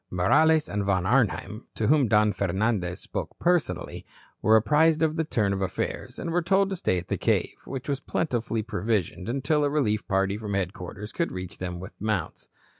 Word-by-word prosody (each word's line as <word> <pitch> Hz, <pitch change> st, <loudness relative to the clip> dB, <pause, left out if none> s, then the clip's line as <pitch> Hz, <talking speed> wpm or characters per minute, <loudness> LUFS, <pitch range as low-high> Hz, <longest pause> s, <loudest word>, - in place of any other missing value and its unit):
Morales 150 Hz, -, +3 dB
and 105 Hz, 0 st, -2 dB
Von 95 Hz, -2 st, +1 dB
Arnheim, 110 Hz, -1 st, 0 dB
to 110 Hz, -, -1 dB
whom 140 Hz, 0 st, +4 dB
Don 105 Hz, -1 st, +3 dB
Fernandez 95 Hz, -1 st, -1 dB
spoke -, -, -6 dB
personally, 175 Hz, -2 st, 0 dB, 0.4 s
were 110 Hz, -, +5 dB
apprised 155 Hz, +8 st, +4 dB
of 160 Hz, -1 st, +1 dB
the 160 Hz, -, +1 dB
turn 105 Hz, -10 st, 0 dB
of 95 Hz, -, -3 dB
affairs, 95 Hz, -, -3 dB
and 170 Hz, -, -4 dB
were 175 Hz, +1 st, +2 dB
told 195 Hz, +3 st, +2 dB
to -, -, -1 dB
stay 95 Hz, -, 0 dB
at 90 Hz, -, -5 dB
the -, -, -1 dB
cave, -, -, +1 dB
which 135 Hz, -1 st, -6 dB
was 140 Hz, -2 st, -1 dB
plentifully 120 Hz, -8 st, -2 dB
provisioned, 100 Hz, -1 st, -2 dB
until 140 Hz, +4 st, +1 dB
a 145 Hz, -, +2 dB
relief 115 Hz, -8 st, 0 dB
party 95 Hz, +1 st, +1 dB
from 105 Hz, -2 st, -3 dB
headquarters 95 Hz, +2 st, -4 dB
could 170 Hz, -, -1 dB
reach 90 Hz, 0 st, -7 dB
them 90 Hz, -1 st, -4 dB
with 95 Hz, +2 st, -9 dB
mounts. 105 Hz, -5 st, -2 dB
110 Hz, 190 wpm, -26 LUFS, 95-150 Hz, 0.4 s, were